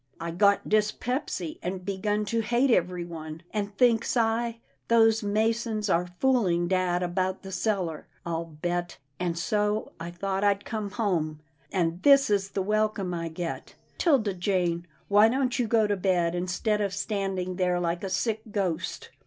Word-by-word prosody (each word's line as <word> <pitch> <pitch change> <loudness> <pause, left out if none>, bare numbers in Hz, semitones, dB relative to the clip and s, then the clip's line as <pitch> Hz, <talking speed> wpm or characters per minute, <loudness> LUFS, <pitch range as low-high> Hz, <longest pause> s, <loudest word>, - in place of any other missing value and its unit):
I 170 0 -4
got 200 +4 +3
dyspepsy, 215 - -1
and 185 +1 -4
begun 205 +2 -1
to 230 +3 0
hate 240 +4 +2
everyone, 170 -4 -2
and, 205 -1 -3
thinks 235 -1 +3
I, 230 0 +1 0.3
those 225 -1 +5
masons 220 0 0
are 175 +1 +1
fooling 195 -10 +2
dad 180 -1 +1
about 185 +2 -1
the 190 - -8
cellar, 185 -6 -1 0.2
I'll 170 -1 -2
bet, 175 +2 -3 0.2
and 175 -2 -1
so 210 +4 0
I 165 +1 -5
thought 195 +3 -2
I'd 200 -1 +2
come 215 -2 -3
home 175 -8 -1 0.2
— 135 0 -37
and 170 -1 0
this 275 -4 +6
is 200 -1 +1
the 195 - -2
welcome 210 -2 0
I 165 -1 -3
get 165 +1 -5
— - - -36
'Tilda 260 - +3
Jane, 175 -2 0 0.2
why 205 +2 +6
don't 255 0 0
you 240 - +1
go 220 -1 +3
to 205 -1 +1
bed, 180 -3 +1
instead 185 +4 0
of 200 -1 -1
standing 195 -3 -2
there 180 -1 +1
like 170 +1 -1
a 195 - -2
sick 215 +4 0
ghost? 190 -6 -2
195 Hz, 165 wpm, -27 LUFS, 175-215 Hz, 0.3 s, this